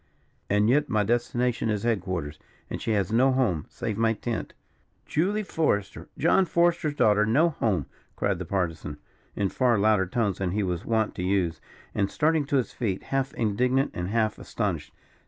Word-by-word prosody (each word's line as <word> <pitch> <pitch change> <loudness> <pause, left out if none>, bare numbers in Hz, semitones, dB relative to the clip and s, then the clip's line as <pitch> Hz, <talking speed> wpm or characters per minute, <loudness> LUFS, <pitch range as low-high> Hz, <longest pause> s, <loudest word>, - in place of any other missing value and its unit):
"And 105 +1 +3
yet 145 +5 +3
my 105 -2 +2
destination 120 +1 0
is 105 -2 -1
headquarters; 95 -9 -2 0.3
and - - -4
she 115 - 0
has 100 -2 0
no 130 +4 +4
home, 110 - 0
save 110 -1 -4
my 115 0 +3
tent." 115 +1 -4 0.5
"Julia 200 +7 0
Forester 105 - -1
John 190 - +4
Forester's 170 -3 +1
daughter 105 -5 +4
no 140 +11 +3
home!" 105 - 0 0.3
cried 100 -3 0
the 90 - -4
Partisan, 80 -5 -2 0.4
in 100 -2 0
far 125 0 +2
louder 100 -2 +3
tones 100 -1 -1
than 90 -2 -1
he 105 0 0
was 90 -3 -2
wont 110 -2 +1
to 90 - -5
use, 90 -4 0 0.3
and 100 -1 0
starting 155 -1 +1
to 140 - -1
his 130 - -1
feet, 100 -6 -2
half 135 0 +1
indignant 125 +5 +1
and 90 0 -3
half 110 +1 0
astonished. - - -3
110 Hz, 175 wpm, -26 LUFS, 95-130 Hz, 0.5 s, no